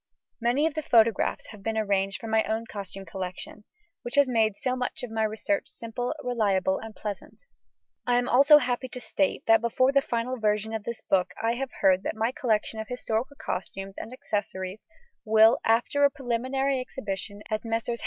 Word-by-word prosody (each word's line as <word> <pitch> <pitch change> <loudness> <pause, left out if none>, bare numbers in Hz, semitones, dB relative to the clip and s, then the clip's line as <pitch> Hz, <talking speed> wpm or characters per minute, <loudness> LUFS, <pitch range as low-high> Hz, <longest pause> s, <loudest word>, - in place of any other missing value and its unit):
Many 245 +6 +2
of 320 - 0
the 310 - -2
photographs 230 -6 +2
have 210 -2 -11
been 220 +2 -2
arranged 195 -2 0
from 225 -1 -6
my 220 0 +4
own 220 +1 -2
costume 195 -2 -7
collection, 185 +3 -7 0.4
which 240 - -5
has 285 -1 +5
made 220 -4 +2
so 255 0 -1
much 250 -1 -3
of 245 - -5
my 225 0 -1
research 220 +8 -1
simple, 245 +4 -4
reliable, 200 -6 +1
and 225 -1 -9
pleasant. 210 - -7 0.6
I 245 - +3
am 245 0 +1
also 280 +5 +7
happy 250 -2 -1
to 250 - -7
state 195 -4 -1
that 225 -1 +5
before 255 +3 +2
the 275 0 +4
final 245 +1 -2
revision 215 0 0
of 220 -2 -4
this 235 -1 -5
book 180 -1 +1
I 225 +1 +1
have 265 +2 -3
heard 190 -1 +5
that - - -3
my 225 +2 0
collection 220 -3 -1
of 220 - -5
historical 250 +2 -2
costumes 195 +1 -4
and 225 - -7
accessories 205 -7 -4 0.4
will, 220 +1 +6
after 240 +5 +2
a 285 - +7
preliminary 265 0 -1
exhibition 205 -5 -6
at 215 0 -1
Messrs. 230 +1 -2
225 Hz, 185 wpm, -27 LUFS, 210-250 Hz, 0.6 s, also